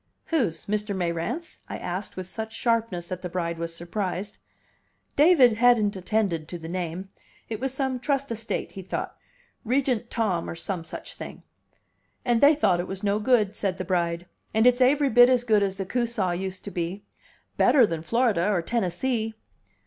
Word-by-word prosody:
"Whose? 230 - 0
Mr. 210 0 -1
Mayrant's?" 175 - -3
I - - -4
asked 185 +3 -5
with 185 - -4
such 220 +3 -6
sharpness 230 -7 0
that 185 0 -5
the 180 - -4
bride 170 -2 -2
was 165 0 -4
surprised. 185 +3 -4 0.8
David 290 -6 +6
hadn't 225 -3 +4
attended 185 -4 -1
to 175 - -5
the 160 -1 -8
name. 180 +2 -4 0.4
It 220 - -3
was 265 +1 -1
some 265 -1 -1
trust 275 0 -1
estate, 225 0 -3
he 195 - -7
thought; 185 - -4 0.5
Regent 250 -1 0
Tom, 205 -7 -1
or - - -5
some 170 +1 -3
such 160 - -7
thing. - - -9 0.8
"And 240 -2 +2
they 290 +2 +7
thought 185 -12 +2
it 175 - -2
was 190 +1 -6
no 205 +1 +1
good," 215 -3 +2
said 190 -3 -2
the 185 - -4
bride. 170 -1 0 0.3
"And 220 +1 +4
it's 250 +1 +5
aivry 280 +2 +4
bit 245 +1 +8
as 250 -2 +3
good 215 -4 +3
as 195 -1 0
the 195 -1 -4
Coosaw 230 -3 0
used 185 +1 -4
to 200 - -7
be. 175 +3 -3 0.5
Better 260 -5 +5
than 165 -5 -3
Florida 215 -1 +2
or 185 -5 +1
Tennessee." 225 +3 -1
205 Hz, 180 wpm, -26 LUFS, 180-240 Hz, 0.8 s, bit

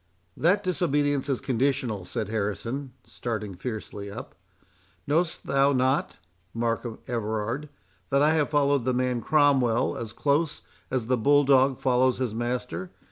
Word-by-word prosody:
"That 195 +5 +2 0.2
obedience 145 -1 +1
is 135 - 0
conditional," 125 -6 0
said 105 +3 -3
Harrison, 115 +5 -3
starting 110 -4 -4
fiercely 105 0 -6
up. 100 - -8 0.7
"Know'st 165 +4 0
thou 140 +1 +3
not, 130 +2 +1 0.4
Markham 115 0 -2
Everard, 115 +4 -2 0.4
that 140 +1 +3
I 150 - +5
have 155 -2 +1
followed 145 -3 +2
the 130 +1 0
man 125 -1 0
Cromwell 135 -5 +3
as 115 -2 -5
close 145 +5 0 0.3
as 125 -3 -1
the 125 +2 +1
bull 145 +5 +4
dog 135 -1 +4
follows 130 0 +2
his 125 -4 -2
master? 125 +9 -3
130 Hz, 135 wpm, -26 LUFS, 115-145 Hz, 0.7 s, I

